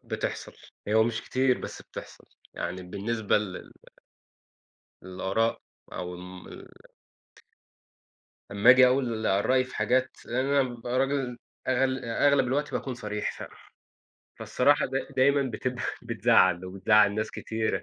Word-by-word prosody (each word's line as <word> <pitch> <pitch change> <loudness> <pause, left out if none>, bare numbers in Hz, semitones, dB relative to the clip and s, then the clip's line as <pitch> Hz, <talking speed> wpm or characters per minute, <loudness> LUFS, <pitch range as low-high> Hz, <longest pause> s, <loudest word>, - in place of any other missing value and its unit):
بتحصل. - - -4 0.4
هو 110 +1 +4
مش 115 -1 -2
كتير، 130 -1 +1
بس - - -7
بتحصل. - - -11 0.3
يعني 90 +2 -4
بالنسبة 105 +4 -1
لل 100 -3 -7 1.3
للآراء 95 +5 -1 0.3
أو 90 0 -5
ال 90 +1 -11 1.8
أما 100 +4 +5
أجي 130 0 +8
أقول 125 -4 0 0.2
رأي 130 0 +3
في 130 - -10
حاجات، 125 +4 +1
لأن 130 +3 -1
أنا 140 0 +3
بابقى 120 0 -3
راجل 135 -2 -1 0.3
أغل 130 0 +1
آآ 115 +4 +1
أغلب 140 -2 +3
الوقت 145 +4 -1
باكون 130 - -3
صريح 105 -3 -4
ف - - -6 0.9
فالصراحة 145 +3 +2
دا 135 +1 -3
دايمًا 140 +2 +4
بتبفى 125 -1 -3 0.2
بتزعّل، 90 -1 +3
وبتزعّل 100 +2 +3
ناس 110 +1 -2
كتيرة. 110 0 -3
120 Hz, 125 wpm, -27 LUFS, 105-130 Hz, 1.8 s, أجي